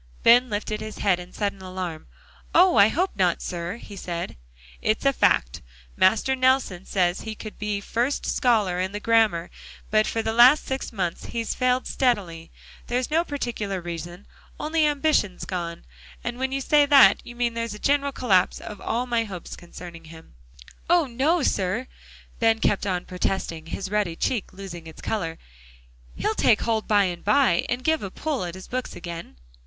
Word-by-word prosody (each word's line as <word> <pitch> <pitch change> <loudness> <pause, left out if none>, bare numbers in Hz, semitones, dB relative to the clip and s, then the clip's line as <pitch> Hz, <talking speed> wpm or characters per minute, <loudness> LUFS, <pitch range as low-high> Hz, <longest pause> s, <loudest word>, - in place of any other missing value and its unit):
Ben 245 +2 +6
lifted 215 0 -3
his 215 0 -7
head 190 -3 +2
in 180 0 -10
sudden 200 -2 -3
alarm. 185 -4 -6 0.5
"Oh! 360 0 +6
I 200 - +8
hope 360 - 0
not, 180 -3 +2
sir," 175 +4 -4
he 205 - -11
said. 175 -3 -5 0.5
"It's 215 +5 0
a 275 - +4
fact. - - +2 0.3
Master 225 +7 +3
Nelson 255 -8 +1
says 180 -1 +1
he 220 -1 -6
could 215 0 -9
be 210 -1 -2
first 240 +7 -1
scholar 210 -8 +2
in 190 +2 -2
the 205 - -3
grammar, 215 -6 +2 0.4
but 215 0 +3
for 225 - -1
the 220 - -1
last 250 +6 +7
six 265 0 -4
months 180 -6 -3
he's 230 -1 -3
failed 255 0 +1
steadily. 190 -11 -1 0.4
There's 250 +3 -1
no 325 +2 +3
particular 235 - -3
reason, 175 +2 -7 0.3
only 310 0 +1
ambition's 290 - +1
gone. 170 -2 -5 0.4
And 240 +1 -4
when 265 0 -1
you 275 0 -2
say 290 +1 +4
that, 270 -9 +7
you 240 - -10
mean 240 -1 0
there's 230 -2 -3
a - - -8
general 280 +4 +1
collapse 195 -9 +2
of 210 -2 -9
all 240 +3 -1
my 235 -2 0
hopes 185 -5 -8
concerning 170 -1 -11
him." 160 - -14 0.6
"Oh! 345 -2 +5
no, 280 +7 +1
sir," 200 +3 0 0.5
Ben 225 -1 +4
kept 205 -2 0
on 180 -2 -1
protesting, 180 -3 -3
his 190 +3 -5
ruddy 205 -6 0
cheek 225 +3 -2
losing 185 -4 -9
its 160 - -12
color. 165 -7 -3 0.8
"He'll 215 - -1
take 220 0 +3
hold 225 -2 -1
by 205 -2 +4
and 175 -2 -3
by 210 -4 +3
and 245 +1 -2
give 320 0 +2
a 195 - -4
pull 285 +2 -3
at 170 0 -6
his 185 - -10
books 255 +1 -4
again." 170 - -8
210 Hz, 180 wpm, -24 LUFS, 180-250 Hz, 0.8 s, I